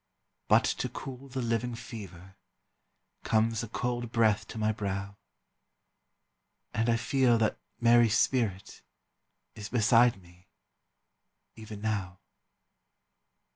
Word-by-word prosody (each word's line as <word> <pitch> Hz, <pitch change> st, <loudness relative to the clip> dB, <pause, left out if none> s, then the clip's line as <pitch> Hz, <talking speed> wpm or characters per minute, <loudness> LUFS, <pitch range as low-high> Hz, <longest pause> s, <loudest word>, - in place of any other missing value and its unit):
But -, -, +5 dB, 0.2 s
to -, -, -2 dB
cool 135 Hz, 0 st, -8 dB
the 130 Hz, -1 st, -4 dB
living 115 Hz, +1 st, -1 dB
fever, 95 Hz, -6 st, -10 dB, 0.9 s
Comes 110 Hz, 0 st, +1 dB
a 115 Hz, -, -5 dB
cold 120 Hz, +1 st, -3 dB
breath 110 Hz, -3 st, +2 dB
to -, -, -9 dB
my 110 Hz, 0 st, +1 dB
brow, 100 Hz, -2 st, -4 dB, 1.6 s
And 115 Hz, +2 st, 0 dB
I 115 Hz, -, +4 dB
feel 125 Hz, 0 st, +2 dB
that 110 Hz, -1 st, 0 dB, 0.2 s
Mary's 120 Hz, -2 st, +5 dB
spirit 110 Hz, -8 st, -1 dB, 0.7 s
Is 105 Hz, -2 st, -8 dB
beside 115 Hz, -1 st, +4 dB
me, 90 Hz, 0 st, -21 dB, 1.1 s
even 110 Hz, -2 st, -9 dB
now. 100 Hz, -4 st, -3 dB
110 Hz, 105 wpm, -29 LUFS, 100-120 Hz, 1.6 s, But